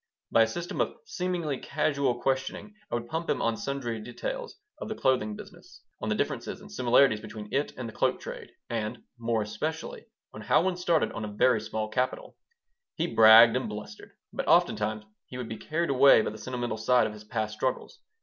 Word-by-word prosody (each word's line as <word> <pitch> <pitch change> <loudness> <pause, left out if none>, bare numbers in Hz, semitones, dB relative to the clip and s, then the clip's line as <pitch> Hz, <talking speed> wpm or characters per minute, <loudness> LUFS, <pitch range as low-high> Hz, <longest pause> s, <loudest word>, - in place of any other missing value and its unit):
By 115 - +5
a 115 - +5
system 175 +9 -3
of - - -1
seemingly 180 - -2
casual 140 -5 0
questioning 135 +11 -2 0.2
I - - -1
would 120 0 -4
pump 160 +5 -4
him - - +1
on 115 -1 +1
sundry 120 -3 -3
details 475 - -6 0.2
of - - -6
the 220 - -3
clothing 115 - +1
business, - - -13 0.2
on - - -2
the - - +1
differences - - -3
and - - -14
similarities 125 -2 +4
between 105 -1 -9
it 145 +2 0
and 125 - -5
the 110 - -9
cloak - - +1
trade, - - -8 0.2
and, 110 -2 -4 0.2
more 115 -2 0
especially, 155 - -5 0.3
on 110 - -8
how 130 - +3
one 185 -1 0
started 175 -3 +1
on 115 - -5
a - - -3
very 110 +2 +3
small 110 0 -3
capital 125 +4 -2 0.6
He 165 - 0
bragged 115 +1 +9
and 130 -3 -1
blustered, 105 0 -9 0.2
but - - -3
oftentimes 110 0 +2 0.2
he 125 - -8
would 125 -2 -5
be 110 - -6
carried 165 +6 -2
away 135 -4 +6
by - - -2
the 110 - -10
sentimental 120 -1 -3
side 125 +3 +3
of 105 - -4
his 105 0 -11
past 110 -2 -3
struggles. 125 +4 -3
120 Hz, 195 wpm, -28 LUFS, 110-140 Hz, 0.6 s, bragged